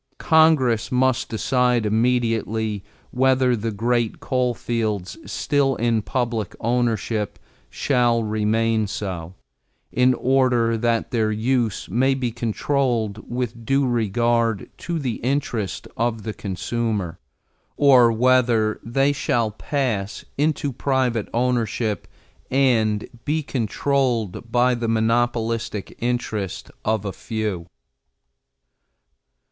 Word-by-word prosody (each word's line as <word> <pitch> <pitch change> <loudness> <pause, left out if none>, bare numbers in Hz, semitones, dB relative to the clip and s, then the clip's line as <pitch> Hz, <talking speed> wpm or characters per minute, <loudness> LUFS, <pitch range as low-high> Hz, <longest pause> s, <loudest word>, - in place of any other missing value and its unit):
Congress 140 -8 +3
must 130 0 +1
decide 125 0 +1
immediately 110 -2 0 0.3
whether 130 -1 +3
the 115 0 -3
great 115 +2 0
coal 125 -2 0
fields 110 -6 -2 0.2
still 140 -3 +1
in 115 -1 +1
public 115 -4 -2
ownership 115 -3 -1 0.3
shall 120 -4 +1
remain 110 +1 +1
so, 95 -4 -5 0.6
in 125 0 +3
order 125 -3 +2
that 115 +2 0
their 110 -3 +1
use 115 0 0
may 130 +3 +2
be 125 -3 -2
controlled 115 -2 -1
with 120 -2 -3
due 135 +4 +2
regard 115 -1 +1
to 170 -1 -4
the 130 -7 -2
interest 120 -6 -2
of 115 -2 -1
the 110 - -4
consumer, 100 -2 -3 0.6
or 130 -5 +6
whether 115 -2 +3
they 135 +4 +2
shall 120 -6 0
pass 110 -4 -2
into 145 -1 0
private 125 -4 0
ownership 115 -3 -1 0.4
and 115 -6 +2 0.2
be 155 +1 0
controlled 125 -3 0
in 120 +1 +1
the 115 - -1
monopolistic 115 -1 0
interest 115 -5 -3
of 110 -1 0
a 100 - -3
few. 105 -6 -4
115 Hz, 105 wpm, -22 LUFS, 110-125 Hz, 0.6 s, or